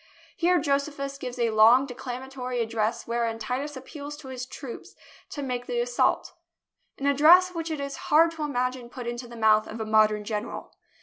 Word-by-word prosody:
Here 360 -1 +3
Josephus 280 -1 -2
gives 250 -1 -6
a 235 -2 +1
long 225 +5 +6
declamatory 255 0 -5
address 225 0 -1
wherein 230 -1 -1
Titus 260 +5 -4
appeals 290 +2 -8
to 285 -3 -11
his 255 -1 -6
troops 255 -2 -9 0.3
to 290 - -5
make 250 -2 -3
the 480 - -1
assault - - +1 0.3
— - - -50
an 275 - -5
address 315 +6 +6
which 330 -1 -4
it 310 -2 -3
is 280 0 -4
hard 325 +2 +6
to 325 -1 -9
imagine 255 -3 -2
put 250 0 -8
into 240 +1 -5
the 235 - -11
mouth 215 -1 +4
of 225 - -7
a 220 - -3
modern 215 -1 +3
general. 210 +1 -5
255 Hz, 185 wpm, -26 LUFS, 235-290 Hz, 0.3 s, long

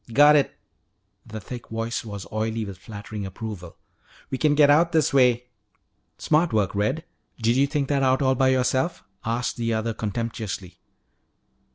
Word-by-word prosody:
"Got 145 +4 +7
it!" 145 - +1 0.7
The 110 - -6
thick 120 +4 -8
voice 115 +1 -3
was 100 -3 -7
oily 110 +1 -2
with 95 -2 -9
flattering 105 0 -7
approval. 95 -2 -7 0.5
"We 130 - -2
can 150 -1 +3
get 145 -1 +6
out 165 +4 +4
this 155 -2 +2
way 125 -2 +3 0.3
" - - -48 0.3
"Smart 160 +2 +2
work, 105 -4 +1
Red. 120 +11 -1 0.3
Did 115 +1 +2
you 140 +2 +3
think 140 -1 -1
that 140 -2 +2
out 130 0 +3
all 130 0 +3
by 130 +1 +2
yourself?" 130 +5 +1 0.2
asked 115 +2 -2
the 115 -1 0
other 110 +1 -1
contemptuously. 110 -3 -4
120 Hz, 165 wpm, -24 LUFS, 110-135 Hz, 0.7 s, Got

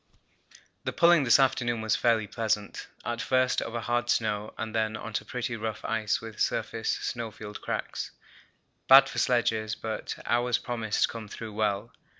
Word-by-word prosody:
The - - -3
pulling 170 -4 +5
this 125 +3 +6
afternoon 120 -3 +2
was 110 -1 +1
fairly 115 -1 +2
pleasant; 105 -1 -2 0.2
at 120 +1 -2
first 130 0 +2
over 115 +1 -3
hard 120 +1 -1
snow, 105 -2 0
and 110 -1 -4
then 110 -1 0
on 115 - -7
to 105 - -2
pretty 120 -1 -3
rough 110 -1 -4
ice 110 -2 0
with 110 -1 -9
surface 115 -1 -1
snowfield 110 -3 -5
cracks, - - -3 0.8
bad 135 +1 +9
for - - -3
sledges, 110 -3 +1
but 110 -1 -5
ours 120 0 +2
promised 115 -3 -1
to - - +5
come 115 -2 -7
through 110 +1 -8
well. 105 +1 -1
115 Hz, 160 wpm, -28 LUFS, 110-120 Hz, 0.8 s, bad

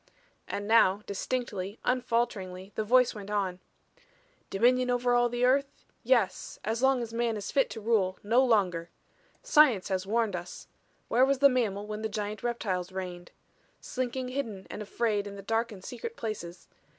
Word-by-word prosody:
And 205 0 -4
now 210 -3 +4
distinctly, 200 -2 -3
unfalteringly, 210 -7 -1
the 220 - -1
voice 250 +3 +4
went 205 -2 -8
on: 195 -3 -1 0.9
"Dominion 250 +5 +3
over 245 0 +2
all 240 0 +3
the 240 +1 +1
earth? 275 +2 +1 0.2
Yes 235 -5 +1
as 225 +3 -1
long 265 -2 +3
as 230 -1 -7
man 230 -1 0
is 205 - -5
fit 270 -2 +2
to 225 - -6
rule; 205 -4 +1
no 235 +5 +4
longer. 185 -9 +1 0.5
Science 295 - +4
has 190 0 -1
warned 220 -2 +1
us. 175 +1 -7 0.4
Where 245 +3 +3
was 275 +1 +3
the 280 +1 +6
mammal 215 -6 0
when 210 0 -5
the 220 - -2
giant 210 0 -4
reptiles 195 -7 -2
reigned? 180 -2 -6 0.5
Slinking 255 0 -3
hidden 230 -8 -4
and - - -6
afraid 210 -1 -1
in 200 - -8
the 200 - -9
dark 225 +3 0
and 190 -3 -11
secret 255 - -7
places. 185 -6 -6
220 Hz, 165 wpm, -29 LUFS, 195-245 Hz, 0.9 s, the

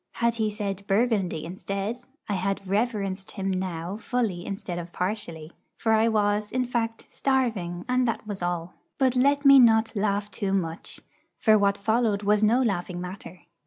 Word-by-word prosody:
Had 235 0 +1
he 220 -1 +1
said 200 -2 -3
'Burgundy' 195 -6 +1
instead, 195 +5 -3 0.3
I 205 - -1
had 195 +1 -2
reverenced 200 -2 -1
him 195 -1 -2
now 185 0 -3
fully 225 -7 -2
instead 190 -3 -4
of 170 0 -8
partially. 175 -5 -4 0.3
For 225 - 0
I 220 +1 +4
was, 210 -1 +1
in 255 0 0
fact, 230 -2 -2
starving, 220 -11 -1
and 250 0 +2
that 230 - -2
was 205 -3 -6
all. 175 0 -2 0.2
But 260 -2 +2
let 280 +3 +3
me 275 -1 +9
not 225 -2 +4
laugh 205 0 0
too 195 -1 -2
much; 165 -4 -3 0.4
for 220 -2 +4
what 200 -1 +3
followed 220 0 +1
was 210 +1 +3
no 230 +5 +4
laughing 180 -5 -2
matter. 180 -1 -8
205 Hz, 165 wpm, -26 LUFS, 185-230 Hz, 0.4 s, me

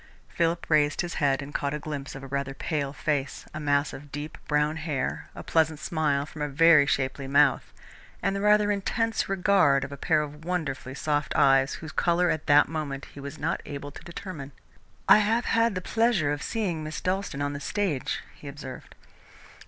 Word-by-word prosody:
Philip 170 0 0
raised 145 -2 +3
his 175 -1 -4
head 140 -1 +2
and 145 +1 -10
caught 140 +1 -1
a - - -4
glimpse 145 -3 -6
of 135 - -8
a - - -7
rather 140 0 -3
pale 140 -2 -2
face, 145 -1 -2
a 155 - -5
mass 145 -1 +1
of 145 +1 -10
deep 145 +2 -6
brown 150 +1 +1
hair, 155 -3 -3
a - - -7
pleasant 160 -2 +1
smile 150 -4 0
from 150 0 -10
a 150 - 0
very 155 0 +6
shapely 135 0 -1
mouth, 140 0 +3 0.5
and 195 - 0
the 200 - -2
rather 210 0 +4
intense 225 +3 -1
regard 185 -8 +3
of 140 - -6
a 140 - -7
pair 155 0 +2
of 150 +1 -9
wonderfully 155 -7 -3
soft 145 0 -1
eyes, 135 0 +4
whose 160 -1 -8
colour 175 +3 +2
at 155 - -3
that 145 0 +6
moment 145 -4 -4
he - - -10
was 140 +2 -7
not - - -1
able 145 0 -6
to 145 - -12
determine. 165 -5 -8 0.5
"I - - +8
have 225 +3 +1
had 230 -2 +2
the 185 - -2
pleasure 220 -8 +1
of 145 0 -3
seeing 185 -9 -2
Miss 155 0 -5
Dalstan 185 -6 -2
on 145 0 -2
the 145 - -5
stage," 160 -2 -2
he 145 - -13
observed. 140 -2 -9
150 Hz, 195 wpm, -27 LUFS, 140-170 Hz, 0.5 s, I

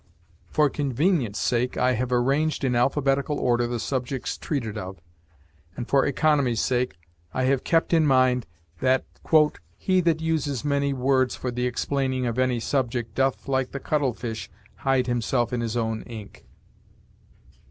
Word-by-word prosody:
For 150 -1 +3
convenience' 140 - 0
sake 125 0 0
I 125 0 +3
have 125 +1 -1
arranged 140 +6 +1
in 130 -2 +1
alphabetical 135 +3 +1
order 120 -1 +2
the 120 0 -3
subjects 130 +1 -3
treated 120 -8 -3
of, 95 -3 -6 0.8
and 120 - -4
for 135 -1 +3
economy's 140 -4 +2
sake 125 -5 0 0.4
I 130 - +1
have 130 0 +2
kept 165 0 +1
in 160 -2 +4
mind 130 - +3 0.3
that 130 0 +2 0.7
"he 185 -1 +2
that 165 -2 +2
uses 155 -4 -1
many 140 -1 +1
words 130 -1 +1
for 125 - -4
the 125 +1 -1
explaining 130 +1 -1
of 120 +1 -2
any 130 -2 +2
subject 120 -2 -1
doth, 135 0 0
like 130 -1 0
the 140 - -3
cuttle 140 -3 0
fish, 115 -2 -5 0.3
hide 135 -2 +1
himself 120 0 0
in 120 - 0
his 115 0 -2
own 110 -1 -1
ink." 110 -4 -10
130 Hz, 150 wpm, -25 LUFS, 120-140 Hz, 0.8 s, in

